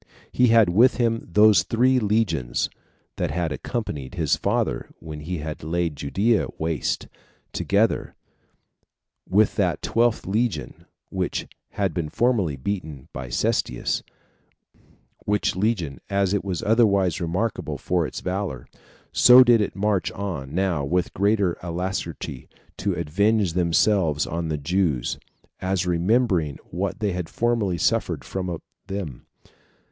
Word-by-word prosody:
He 125 - +4
had 115 -4 +5
with 115 +9 +5
him 115 -2 0
those 105 +2 +6
three 125 +3 +2
legions 100 - 0 0.5
that 90 - -1
had 85 +1 -1
accompanied 85 - -4
his 80 -5 +2
father - - -1
when 75 -2 -8
he 80 0 -5 0.2
laid 85 0 -1
Judea 100 +11 +1
waste, 80 0 -2 0.5
together - - +1 1.1
with 105 +3 +3
that - - 0
twelfth 120 0 +1
legion 110 +4 -2 0.3
which - - -2 0.3
had 95 -4 -1
been 80 -2 -2
formerly 105 - +1
beaten 75 -2 -5
with 65 -3 -6
Cestius; - - 0 1.2
which 105 -3 +1
legion, 95 -8 -1
as 100 -1 +1
it 100 - 0
was 95 -3 -3
otherwise 100 -6 +3
remarkable 90 +7 -2
for 90 -3 0
its - - -7
valor, 90 -9 -3 0.5
so 125 +1 +8
did 120 -3 +5
it 105 - -2
march 100 -1 0
on 85 -8 -5
now 90 -6 +1
with 90 +5 0
greater 100 -3 +1
alacrity 85 -6 -4 0.3
to 100 0 -1
avenge 95 +4 +1
themselves 85 -2 +2
on 85 0 -3
the 80 -1 -1
Jews, 75 -3 0 0.4
as 95 -1 -1
remembering 90 - +1
what 95 +4 -3
they 105 -2 +1
had 90 -2 -4
formerly 115 -6 0
suffered - - 0
from 90 -3 -4 0.3
them. 95 -10 -6
95 Hz, 125 wpm, -24 LUFS, 80-105 Hz, 1.2 s, so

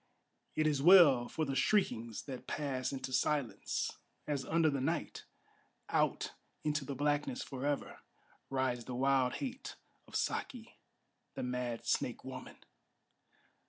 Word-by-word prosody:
it 155 - +2
is 145 -3 +2
well 150 -8 +8
for 160 - -2
the 135 - -2
shriekings 120 - +1
that 130 -3 -8
pass 135 -3 -2
into 130 -1 -5
silence, 145 -3 0 0.3
As 145 -3 -1
under 165 0 +3
the 140 -2 -1
night, 160 +4 -2 0.6
out - - +1 0.3
into 150 -1 0
the 140 0 -5
blackness 145 - 0
forever, 140 +1 -3 0.5
Rides 130 -3 0
the 125 - -5
wild 130 -1 +3
hate 260 -1 -5 0.3
of - - -11
Saki, 235 -3 -3 0.6
the - - -3
mad 125 -2 -3
snake - - 0
woman! - - -8
140 Hz, 125 wpm, -34 LUFS, 130-155 Hz, 0.6 s, well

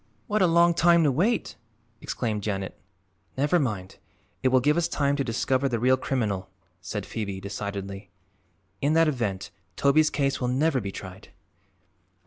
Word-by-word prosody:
"What 215 -2 0
a 185 - +5
long 170 +1 +4
time 170 0 +4
to 145 - +3
wait!" 195 - 0 0.4
exclaimed 110 -4 -2
Janet. 95 -2 -3 0.6
"Never 145 +6 +2
mind; 105 - -3 0.4
it 130 - +2
will 130 0 +4
give 145 +4 +2
us 170 -1 +1
time 140 -1 0
to 140 - 0
discover 130 +3 0
the 120 - 0
real 130 +3 +4
criminal," 110 -8 -2 0.3
said - - -5
Phoebe 100 -4 -4
decidedly. 100 -1 -6 0.7
"In 145 +2 +2
that 165 0 +4
event 115 -10 -2 0.2
Toby's 150 +5 +4
case 135 -2 -1
will 125 - 0
never 135 +2 +1
be 100 -1 -4
tried." 95 -1 -10
130 Hz, 155 wpm, -26 LUFS, 100-150 Hz, 0.7 s, a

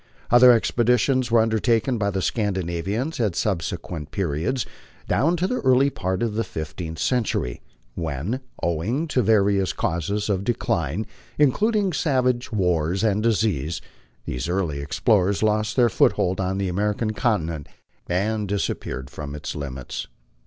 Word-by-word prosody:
Other 125 +1 +8
expeditions 125 +2 +2
were 115 -1 +5
undertaken 115 +2 +1
by 100 -1 +1
the 95 -2 -2
Scandinavians 100 - -1
at 105 -7 +1
subsequent 85 -5 -2
periods 90 - -1 0.4
down 165 +6 +2
to 175 - 0
the 250 +6 -1
early 130 +1 +4
part 95 -3 -2
of 115 -3 -1
the 115 +2 0
fifteenth 80 -2 -6
century, 110 - -1 0.3
when, 80 - -3 0.2
owing 100 - 0
to 130 - +2
various 100 -4 +3
causes 100 +6 -1
of 100 -2 0
decline, 100 - -1 0.3
in 145 -3 +5
cluding 210 - +1
savage 125 -5 +1
wars 90 -2 +1
and 105 -1 +2
disease, 100 - 0 0.5
these 60 +6 -3
early 85 -6 -1
explorers 95 +7 +1
lost 105 0 +1
their 125 -2 +5
foothold 95 -3 +2
on 95 +1 -1
the 100 -1 -1
American 105 +4 -1
continent 85 - -1 0.4
and 105 +4 0
disappeared 75 -8 -3
from 75 -1 -6
its 75 - -5
limits. 65 -5 -5
100 Hz, 140 wpm, -23 LUFS, 85-120 Hz, 0.5 s, Other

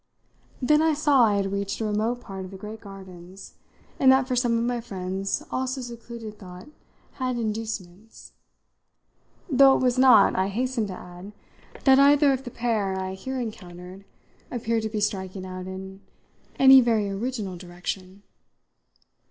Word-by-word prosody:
Then 300 +4 +4
I 320 -1 +2
saw 285 -4 +4
I 210 -2 +2
had 195 -1 -1
reached 200 0 -3
a 220 - -2
remote 220 +4 -1
part 195 -3 -7
of 185 - -8
the 195 - -10
great 215 +3 -9
gardens, 190 -2 -12 0.5
and 265 -1 +6
that 265 -1 +3
for 255 - -1
some 240 -2 +1
of 230 - 0
my 240 0 -1
friends 195 -3 -4
also 260 +1 -2
secluded 235 -3 -9
thought 180 +1 -11 0.5
had 255 -1 -1
inducements; 215 -3 -6 1.2
though 275 -3 +6
it - - -2
was 250 0 +2
not, 245 -6 +6
I 190 +1 +1
hasten 235 +2 -2
to 190 - -6
add, 180 +3 -11 0.5
that 265 -1 +6
either 280 0 +5
of 265 +1 -4
the - - -5
pair 215 -6 -1
I 190 0 -4
here 260 +7 -5
encountered 185 -4 -8 0.5
appeared 230 -2 -1
to 220 - -3
be 215 -1 -3
striking 190 -2 -3
out 185 0 -7
in 190 +1 -8 0.6
any 265 0 +8
very 225 -4 +1
original 200 -1 -4
direction. 185 +2 -7
215 Hz, 160 wpm, -25 LUFS, 190-250 Hz, 1.2 s, any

